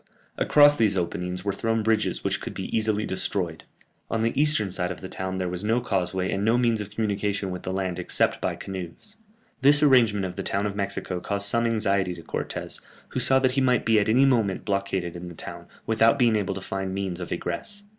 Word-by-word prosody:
Across 145 0 +5
these 105 -4 +2
openings 90 +1 -3
were 100 - 0
thrown 115 +2 -1
bridges 110 -1 0
which - - -1
could - - -6
be - - -4
easily 110 -1 +1
destroyed. 90 -3 -3 0.4
On 115 0 0
the 115 - +1
eastern 140 -9 +2
side 90 -1 0
of - - -7
the 95 - -7
town 95 0 -4
there 90 -1 -2
was 90 +2 -4
no 115 +3 +2
causeway 95 -5 -1
and 100 - -1
no 115 +3 +3
means 115 -3 +1
of 105 - -6
communication 100 -2 -2
with 90 - -5
the 95 - -4
land 95 -2 -2
except - - 0
by - - -1
canoes. 95 - -8 0.4
This 145 +2 +6
arrangement 115 -8 +4
of 90 -1 -6
the - - -2
town 100 +1 -1
of 100 -1 -3
Mexico 100 -2 -3
caused 100 +2 0
some 115 +3 +3
anxiety 100 -5 0
to 85 - -11
Cortès, - - -4 0.3
who - - -3
saw 135 - +5
that 130 -1 +2
he 135 +1 0
might 125 -2 +2
be 110 -1 +4
at 105 - 0
any 130 +5 +5
moment 115 -8 +1
blockaded 100 -3 -2
in 90 0 -7
the 85 - -11
town, 85 +1 -9 0.2
without 115 +4 +3
being 120 -4 +3
able 100 -2 -1
to 95 - -6
find 95 0 -4
means 95 -3 -3
of 90 - -6
egress. 90 - -4
100 Hz, 220 wpm, -25 LUFS, 95-115 Hz, 0.4 s, This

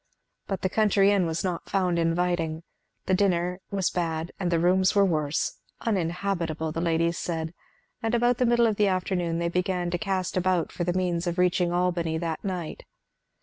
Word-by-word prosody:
But 195 - -3
the - - +3
country 200 0 +3
inn 195 -4 +2
was 165 0 -2
not 180 -3 -3
found 180 -3 +1
inviting; 165 -1 0 0.4
the 185 - +1
dinner 180 -2 +1
was 190 -2 0
bad 165 -1 -2
and 180 -3 0
the 170 - +3
rooms 185 +3 +3
were 200 -1 +5
worse; 155 -3 -1 0.2
uninhabitable, 170 -5 -1
the 165 - -3
ladies 170 0 +1
said; 165 -1 -3 0.5
and 225 +1 0
about 240 +1 +2
the 250 - +3
middle 235 0 +4
of 220 -3 +1
the 210 - +3
afternoon 180 -3 0
they 170 0 0
began 180 0 -1
to 175 - -1
cast 190 -3 -2
about 185 -2 +1
for 175 - -3
the 175 0 0
means 180 -1 -1
of 175 +1 -2
reaching 180 -1 +2
Albany 175 -2 0
that 165 -1 -3
night. 180 -5 -4
180 Hz, 185 wpm, -26 LUFS, 170-190 Hz, 0.5 s, were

